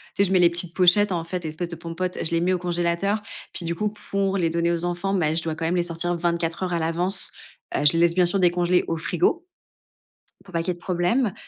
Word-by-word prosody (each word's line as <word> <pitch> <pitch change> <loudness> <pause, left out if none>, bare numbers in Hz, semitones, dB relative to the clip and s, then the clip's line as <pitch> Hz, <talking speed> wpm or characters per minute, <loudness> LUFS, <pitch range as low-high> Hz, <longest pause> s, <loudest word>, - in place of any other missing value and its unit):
Tu 200 - +3
sais - - +2
je - - -4
mets 190 - +4
les 175 -1 +6
petites 170 -1 -1
pochettes 190 +2 +5
en 170 -2 -1
fait, 175 +1 -5
les 155 - -3
espèces 170 +2 -5
de 170 - -6
Pom'potes, 170 +2 -4
je - - +3
les 165 0 +1
mets 185 +1 +2
au 180 - 0
congélateur. 175 +4 0 0.3
Puis 170 - -5
du 170 - -1
coup, 210 +3 -2 0.2
pour 195 0 +1
les 170 -3 +1
donner 170 0 +1
aux 170 0 -2
enfants, 175 +3 -1
beh, 160 -3 +1
je 165 - +2
dois 160 -1 -3
quand 160 - -3
même 175 +2 +1
les 175 - +2
sortir 175 +1 -2
24 170 0 -1
heures 180 -1 -2
à 170 - +1
l'avance. 170 +4 -1 0.4
Heu, - - +1
je 145 - +6
les 165 - +1
laisse 170 0 +4
bien 180 -2 +4
sûr 195 +2 +1
décongeler 180 0 +3
au 165 - -1
frigo 180 - 0 1.0
pour 185 - -16
pas 170 - 0
qu'il 165 - -5
y - - +3
ait - - -1
de - - -17
problème. 185 +6 0
175 Hz, 275 wpm, -24 LUFS, 170-185 Hz, 1.0 s, les